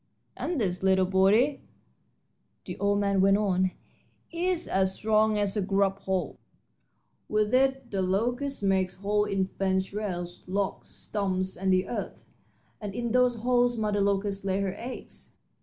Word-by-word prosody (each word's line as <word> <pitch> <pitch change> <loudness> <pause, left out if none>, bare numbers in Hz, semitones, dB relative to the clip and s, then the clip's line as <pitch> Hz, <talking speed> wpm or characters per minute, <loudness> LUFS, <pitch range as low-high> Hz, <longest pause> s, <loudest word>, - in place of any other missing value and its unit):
"And 345 -5 -2
this 180 -5 -1
little 190 0 +3
body," 200 +9 +3 1.0
the - - -5
old 200 0 +2
man 200 -1 +2
went 195 +1 +5
on, 190 -3 +1 0.6
"is 350 0 -1
as 190 0 +1
strong 215 0 +2
as 205 -1 0
a 210 - +1
grub 195 0 +1
hoe. 190 -1 -2 0.9
With 215 +1 +1
it 265 +1 +2
the 195 -2 -1
locust 240 +8 -1
makes 190 -2 +1
holes 210 +1 +1
in 195 -1 +1
fence 190 0 -1
rails, 175 -4 -4
logs, 195 +1 -2
stumps, 190 -2 -2
and 190 +1 0
the 185 0 +2
earth, 240 - -5 0.6
and 205 -2 -5
in 235 -1 -2
those 250 0 +3
holes 245 +1 +2
mother 210 -2 0
locust 200 0 0
lays 195 0 0
her 190 -2 -2
eggs. 250 +2 -9
200 Hz, 150 wpm, -28 LUFS, 190-220 Hz, 1.0 s, went